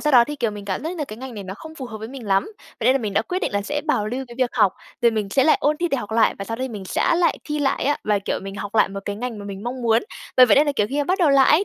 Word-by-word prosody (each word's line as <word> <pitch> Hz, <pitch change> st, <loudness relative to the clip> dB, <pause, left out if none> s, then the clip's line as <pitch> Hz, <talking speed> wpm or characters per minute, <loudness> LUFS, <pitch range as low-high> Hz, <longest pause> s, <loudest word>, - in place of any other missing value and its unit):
sau 300 Hz, -1 st, +1 dB
đó 240 Hz, -2 st, +8 dB
thì, 295 Hz, +2 st, -6 dB
kiểu, 240 Hz, -5 st, 0 dB
mình 205 Hz, -1 st, -8 dB
cảm 190 Hz, +4 st, -3 dB
giác 320 Hz, -, -3 dB
như 360 Hz, -, -6 dB
là 300 Hz, -, -2 dB
cái 215 Hz, -5 st, -9 dB
ngành 260 Hz, 0 st, -8 dB
này 205 Hz, -3 st, -7 dB
nó 190 Hz, -, -6 dB
không 315 Hz, +8 st, -11 dB
phù 265 Hz, -4 st, -6 dB
hợp 220 Hz, -2 st, -8 dB
với 220 Hz, +1 st, -7 dB
mình 255 Hz, -4 st, -9 dB
lắm. 195 Hz, 0 st, +3 dB, 0.4 s
Vậy 230 Hz, -, 0 dB
nên 255 Hz, -, +7 dB
là 270 Hz, -, +2 dB
mình 210 Hz, -4 st, -3 dB
đã -, -, +2 dB
quyết 365 Hz, -1 st, -2 dB
định -, -, -2 dB
là 200 Hz, 0 st, 0 dB
sẽ 290 Hz, +7 st, -2 dB
bảo 215 Hz, -9 st, +1 dB
lưu 255 Hz, +5 st, -3 dB
cái 240 Hz, -, -10 dB
việc 255 Hz, -2 st, +2 dB
học, 210 Hz, -6 st, +3 dB, 0.3 s
rồi 235 Hz, -, +6 dB
mình 215 Hz, -3 st, -2 dB
sẽ 265 Hz, +5 st, +3 dB
lại 310 Hz, -, +5 dB
ôn 300 Hz, +1 st, +2 dB
thi 345 Hz, +1 st, -1 dB
để 280 Hz, -, 0 dB
học 215 Hz, -4 st, -5 dB
lại 225 Hz, 0 st, +3 dB
và 195 Hz, -, -4 dB
sau 225 Hz, -, -4 dB
đấy 260 Hz, +2 st, -3 dB
mình 210 Hz, -5 st, -7 dB
sẽ 190 Hz, -, +1 dB
lại 345 Hz, 0 st, +2 dB
thi 300 Hz, 0 st, -3 dB
lại 270 Hz, -3 st, 0 dB
á. 290 Hz, +2 st, +2 dB
Và, 210 Hz, -1 st, +2 dB
kiểu, 195 Hz, -, -2 dB
mình 195 Hz, 0 st, -7 dB
học 205 Hz, +1 st, -6 dB
lại 215 Hz, -, +4 dB
một 195 Hz, +1 st, -6 dB
cái 205 Hz, -, -3 dB
ngành 240 Hz, 0 st, -4 dB
mà 205 Hz, -, -8 dB
mình 200 Hz, -1 st, -7 dB
mong 245 Hz, +2 st, -4 dB
muốn. 225 Hz, -1 st, +3 dB, 0.3 s
Bởi 255 Hz, -, +9 dB
vậy 220 Hz, -, +5 dB
nên 295 Hz, +2 st, +5 dB
là, 290 Hz, -, +1 dB
kiểu, 210 Hz, -, +2 dB
khi 280 Hz, -, -1 dB
mà 290 Hz, -, +2 dB
bắt 370 Hz, +6 st, 0 dB
đầu 335 Hz, -6 st, +4 dB
lại 270 Hz, -1 st, +5 dB
ấy, 315 Hz, +7 st, +5 dB
240 Hz, 380 wpm, -22 LUFS, 210-290 Hz, 0.4 s, Bởi